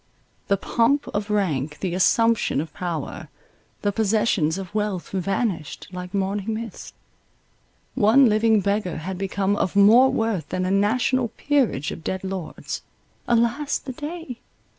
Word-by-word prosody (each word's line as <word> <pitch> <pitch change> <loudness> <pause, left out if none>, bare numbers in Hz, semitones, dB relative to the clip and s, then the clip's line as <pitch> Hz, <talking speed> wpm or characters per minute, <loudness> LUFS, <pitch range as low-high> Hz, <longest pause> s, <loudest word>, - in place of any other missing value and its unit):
The 200 - +2
pomp 245 +8 +1
of 205 +1 -3
rank, 155 -8 0
the 185 -3 -2
assumption 225 0 +2
of 155 0 -5
power, 170 -5 -5 0.5
the 205 - +2
possessions 210 -6 +1
of 195 0 -7
wealth 210 -4 -2
vanished 190 -3 -2
like 180 -1 -7
morning 200 +2 -1
mist. 225 -2 -7 1.0
One 255 +3 +5
living 215 0 +3
beggar 200 -3 -1
had 180 +4 -5
become 195 +1 0
of 195 -2 -1
more 225 +6 +7
worth 220 -9 -1
than 185 0 -1
a 185 - 0
national 235 +5 +2
peerage 240 - 0
of 160 - -8
dead 190 +4 -3
lords— 190 -3 -5 0.5
alas 235 +5 +1
the 260 - -8
day! 300 -3 -7
205 Hz, 140 wpm, -23 LUFS, 185-230 Hz, 1.0 s, more